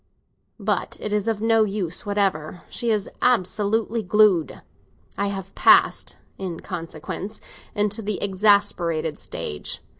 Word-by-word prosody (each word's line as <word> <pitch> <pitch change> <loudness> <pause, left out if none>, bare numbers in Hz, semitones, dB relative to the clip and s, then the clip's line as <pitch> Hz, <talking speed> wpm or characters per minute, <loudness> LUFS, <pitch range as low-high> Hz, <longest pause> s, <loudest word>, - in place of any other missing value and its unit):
But - - -1
it 210 - -3
is 210 0 0
of 220 -2 0
no 225 -1 +4
use 195 -3 -2
whatever; 190 -5 -1
she 235 - -1
is 210 -3 +1
absolutely 220 0 +1
glued. 200 -4 +3 0.5
I 200 - -1
have 195 -1 -5
passed, - - +4 0.2
in 180 -4 -5
consequence, 165 +5 -6 0.4
into 210 +1 0
the 210 -1 -2
exasperated 185 -6 +2
stage. 75 -2 -4
200 Hz, 120 wpm, -23 LUFS, 180-215 Hz, 0.5 s, no